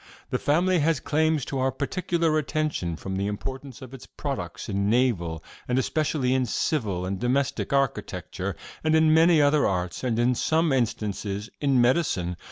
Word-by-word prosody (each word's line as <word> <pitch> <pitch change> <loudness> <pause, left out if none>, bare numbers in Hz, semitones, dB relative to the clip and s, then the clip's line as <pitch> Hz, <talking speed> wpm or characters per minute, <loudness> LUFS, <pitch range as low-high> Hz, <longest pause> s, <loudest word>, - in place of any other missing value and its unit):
'This - - -1
family 175 +5 +2
has 155 -1 +2
claims 155 -1 +1
to 135 - -3
our 130 +1 +1
particular 165 +3 -1
attention 150 - -2
from 95 +4 -5
the 100 +1 -1
importance 130 +5 -6
of 130 0 -11
its 135 - -10
products - - -5
in 100 +1 0
naval, 95 -10 +1 0.2
and 125 - 0
especially 135 -1 0
in 130 0 +2
civil 110 - -1
and 95 0 -3
domestic, 130 +4 0
architecture, 100 -8 -2 0.3
and 155 0 +3
in 160 0 +5
many 165 0 +5
other 145 0 +4
arts, 90 +1 -2
and, 120 -3 0
in 120 +2 +3
some 160 +4 +1
instances, 105 -4 -2
in 140 -3 +2
medicine. 120 - +1
130 Hz, 165 wpm, -26 LUFS, 100-155 Hz, 0.3 s, in